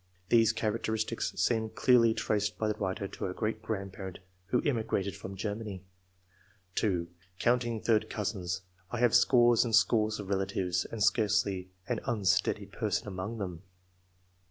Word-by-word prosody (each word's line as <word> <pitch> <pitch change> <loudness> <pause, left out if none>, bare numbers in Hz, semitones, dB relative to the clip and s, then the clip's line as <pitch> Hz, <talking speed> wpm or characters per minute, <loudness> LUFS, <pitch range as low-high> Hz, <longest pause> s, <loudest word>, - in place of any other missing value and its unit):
[These 115 -2 +5
characteristics 110 +1 -1
seem 110 -2 +1
clearly 115 -1 +4
traced 105 0 0
by 110 - 0
the 105 - +1
writer 95 0 -2
to - - -5
a 90 - -5
great 110 0 -2
grandparent 95 -3 -5 0.3
who 125 +5 +2
immigrated 110 -7 0
from 95 - -7
Germany]; 105 -1 -4 0.9
(2) 90 -6 0 0.2
" 90 0 -33
Counting 120 -1 +1
third 110 -1 +2
cousins, 95 -4 -3 0.3
I 120 - -3
have 120 -1 +3
scores 120 -2 +5
and 115 -3 +2
scores 110 -2 +3
of 100 -2 -7
relatives, 95 -2 0
and 110 -3 -3
scarcely 100 -4 +2 0.2
an 120 -3 -1
iinsteady 100 -5 0
person - - -1
among 100 +4 -4
them." 90 -5 -5
105 Hz, 145 wpm, -30 LUFS, 95-115 Hz, 0.9 s, These